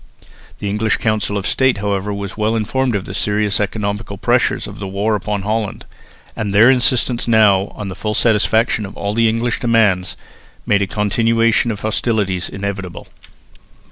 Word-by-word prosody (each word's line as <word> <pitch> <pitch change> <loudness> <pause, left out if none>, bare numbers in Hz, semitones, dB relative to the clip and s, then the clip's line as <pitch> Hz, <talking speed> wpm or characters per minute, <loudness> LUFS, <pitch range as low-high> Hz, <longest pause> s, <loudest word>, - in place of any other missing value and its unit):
The 105 - -5
English 105 +1 0
Council 110 -2 -1
of 100 - -4
State, 130 -3 +2
however, 100 0 -2
was 100 -1 -5
well 110 +1 0
informed 120 +2 0
of 95 - -3
the - - -7
serious 105 +1 0
economical 105 0 -3
pressure - - +2
of - - -8
the 100 - -5
war 100 +3 -1
upon 105 -1 -2
Holland; 110 0 -3 0.5
and 105 -3 -3
their 115 +5 +7
insistence 125 -1 +2
now 105 -4 +4
on 105 -2 -6
the 95 - -6
full 105 0 -3
satisfaction 110 -1 +2
of 95 - -12
all 100 0 -2
the 115 0 +3
English 115 +1 -1
demands 110 -7 +1 0.5
made 100 -1 +2
a 100 - 0
continuation 115 +3 +1
of 105 -2 -4
hostilities 105 -4 -1
inevitable. 95 -2 -6
105 Hz, 165 wpm, -18 LUFS, 100-115 Hz, 0.5 s, their